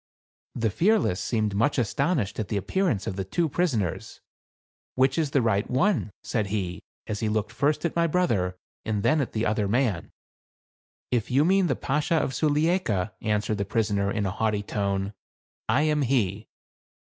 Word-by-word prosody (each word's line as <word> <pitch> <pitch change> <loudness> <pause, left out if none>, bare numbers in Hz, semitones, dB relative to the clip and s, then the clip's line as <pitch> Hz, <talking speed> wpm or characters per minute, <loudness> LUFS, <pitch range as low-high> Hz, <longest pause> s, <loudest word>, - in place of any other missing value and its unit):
The 115 -2 0
Fearless 185 - +2
seemed 110 -3 0
much 115 +10 +1
astonished 125 - 0
at 110 - -2
the 105 - -1
appearance 115 - 0
of 95 - -4
the 95 - -1
two 165 - 0
prisoners. 135 - -1 0.4
" - - -88
Which 130 +1 +3
is 160 -3 0
the 135 -3 +2
right 105 -3 +1
one? 155 - +1
" - - -76
said 110 -4 -1
he, 95 -3 -3 0.2
as 105 -1 -4
he 110 - 0
looked 110 +1 -1
first 145 +7 0
at 170 - -1
my 170 0 +3
brother, 110 - 0 0.3
and 105 -2 -2
then 155 -1 +3
at 130 - -4
the 110 +1 0
other 105 -1 +1
man. 110 -5 0 0.5
" - - - 0.2
If 120 -3 0
you 140 +4 +3
mean 190 +1 +3
the - - +1
Bashaw 150 +4 0
of 135 - -1
Sulieika," 150 - +1
answered 105 0 0
the - - +1
prisoner, 100 -2 0
in 105 0 -1
a 95 - -1
haughty 105 0 0
tone, 100 -1 -2 0.6
"I 145 - +3
am 150 -1 +2
he." 110 -6 0
110 Hz, 185 wpm, -26 LUFS, 100-150 Hz, 0.6 s, Which